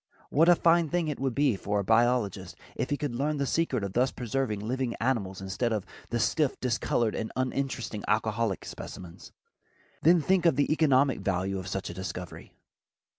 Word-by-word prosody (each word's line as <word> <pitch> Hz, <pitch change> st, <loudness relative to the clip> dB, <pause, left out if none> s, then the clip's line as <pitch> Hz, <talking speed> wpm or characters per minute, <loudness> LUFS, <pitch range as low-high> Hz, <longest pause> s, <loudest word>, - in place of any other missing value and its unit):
What 165 Hz, +4 st, +5 dB
a 175 Hz, -, +8 dB
fine 170 Hz, -1 st, +3 dB
thing 175 Hz, -1 st, 0 dB
it 150 Hz, -, -4 dB
would 135 Hz, -2 st, -1 dB
be 140 Hz, -5 st, +3 dB
for 105 Hz, +1 st, -2 dB
the 100 Hz, -, 0 dB
biologist 115 Hz, -1 st, +1 dB, 0.2 s
if -, -, -2 dB
he 145 Hz, -, 0 dB
could 145 Hz, -4 st, -3 dB
learn 145 Hz, +5 st, -1 dB
the 140 Hz, -, 0 dB
secret 135 Hz, -6 st, 0 dB
of 100 Hz, -1 st, -4 dB
thus 125 Hz, +4 st, +3 dB
preserving 125 Hz, -3 st, -2 dB
living 120 Hz, +3 st, -2 dB
animals 100 Hz, -7 st, -1 dB
instead 95 Hz, +5 st, -2 dB
of 105 Hz, -4 st, -1 dB, 0.2 s
the 120 Hz, -, -1 dB
stiff, 145 Hz, +5 st, +1 dB
discolored 120 Hz, -2 st, 0 dB
and 110 Hz, -, -4 dB
uninteresting 130 Hz, -4 st, -2 dB
alcoholic 110 Hz, -1 st, 0 dB
specimens. 90 Hz, -3 st, -9 dB, 0.7 s
Then 170 Hz, +2 st, +6 dB
think 180 Hz, +2 st, +2 dB
of 165 Hz, -, +4 dB
the 145 Hz, +2 st, +2 dB
economic 140 Hz, -5 st, +3 dB
value 95 Hz, 0 st, -1 dB
of 95 Hz, -, -7 dB
such 95 Hz, -2 st, -3 dB
a -, -, -8 dB
discovery. 90 Hz, -1 st, -7 dB
120 Hz, 180 wpm, -28 LUFS, 105-140 Hz, 0.7 s, a